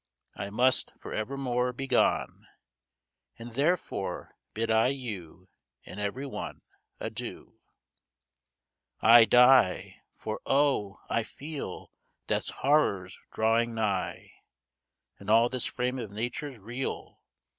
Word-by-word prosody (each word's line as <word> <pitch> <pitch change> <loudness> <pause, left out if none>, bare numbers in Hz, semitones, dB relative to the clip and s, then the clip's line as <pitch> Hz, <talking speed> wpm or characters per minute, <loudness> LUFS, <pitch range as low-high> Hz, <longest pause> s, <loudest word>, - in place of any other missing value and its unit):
I - - -5
must, 125 +5 +3
for - - -8
evermore, 125 +2 -1
be 135 +2 -5
gone; 130 -2 +1 0.9
And 115 +1 -9
therefore 150 +9 -1 0.2
bid 115 +1 -1
I 110 +2 +4
you, 105 -10 -6 0.4
And 95 - -9
every 105 +7 -3
one, 135 - -6 0.4
Adieu! - - -7 1.4
I 115 0 +8
die! 125 -5 +5 0.2
For, 110 0 -5
oh! 135 -8 +1
I 115 - +1
feel 145 +6 -7 0.3
Death's - - -1
horrors 100 -11 +1 0.2
drawing 115 +1 +1
nigh, 100 -4 -2 0.9
And - - -9
all 115 +2 +5
this 130 -1 -1
frame 125 +1 -2
of 115 -4 -5
nature 120 +8 -4
reel. 120 +6 -6
120 Hz, 110 wpm, -29 LUFS, 110-130 Hz, 1.4 s, I